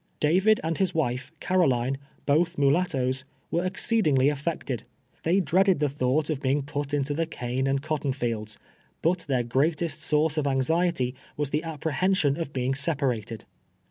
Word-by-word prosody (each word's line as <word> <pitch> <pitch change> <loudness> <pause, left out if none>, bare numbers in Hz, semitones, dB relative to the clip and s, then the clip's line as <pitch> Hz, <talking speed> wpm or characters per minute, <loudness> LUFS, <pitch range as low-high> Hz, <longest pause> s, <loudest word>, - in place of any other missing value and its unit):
David 190 +8 +4
and 165 0 -2
his 190 -4 +1
wife, 130 -3 -1
Car(»line, 135 -8 +1 0.3
both 165 +4 +2
mulat 145 +6 +3
toes, 130 -1 -1 0.3
Avere 175 +2 +1
exceedini2, 190 - +1
ly 130 - +3
affected. 140 -4 -3 0.4
They 175 +4 +2
dreaded 185 +3 +3
the 150 0 +1
thought 145 +3 0
of 145 -3 -3
being 140 +1 0
|)ut 145 0 -2
into 145 0 0
the 165 +2 -1
cane 130 -2 -2
and 135 0 0
cotton 155 -3 -1
fields; 115 -4 -3 0.5
but 175 +2 +2
their 130 -3 +1
greatest 155 +5 0
source 155 0 +1
of 145 - 0
anxiety 135 0 +1 0.2
Avas 145 -2 -2
the 150 - +1
apprehen 165 +4 0
sion 145 -6 +2
of 165 -4 -4
being 130 0 0
separated. 130 -7 -1
145 Hz, 165 wpm, -26 LUFS, 130-165 Hz, 0.5 s, David